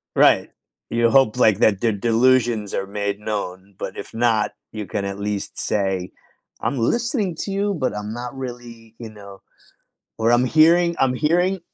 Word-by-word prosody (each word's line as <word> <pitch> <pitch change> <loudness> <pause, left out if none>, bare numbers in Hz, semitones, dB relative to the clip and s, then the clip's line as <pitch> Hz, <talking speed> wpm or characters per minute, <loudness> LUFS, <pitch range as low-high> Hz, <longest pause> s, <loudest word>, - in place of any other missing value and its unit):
Right. - - +4 0.4
You 115 0 +2
hope 130 -4 +3
like 110 -4 +4
that 100 -3 +3
the 115 -2 +2
delusions 115 0 +2
are 95 - -2
made 100 0 -3
known, 100 -2 -5
but - - -6
if - - -8
not, 115 -2 +1 0.2
you 105 -2 -5
can 100 +2 -3
at 100 0 -5
least 100 -1 -4
say, 95 -3 -1 0.5
"I'm 140 - -1
listening 220 - 0
to 200 - -3
you, 200 +1 0
but 130 - -2
I'm 105 +1 -5
not 120 +2 -6
really, 120 -3 -9
you 115 -2 -7
know, 100 -2 -13 0.8
or 115 +1 +2
I'm 120 +1 +4
hearing 170 +4 +4
I'm 130 -1 +2
hearing 175 +6 +1
115 Hz, 170 wpm, -21 LUFS, 105-135 Hz, 0.8 s, Right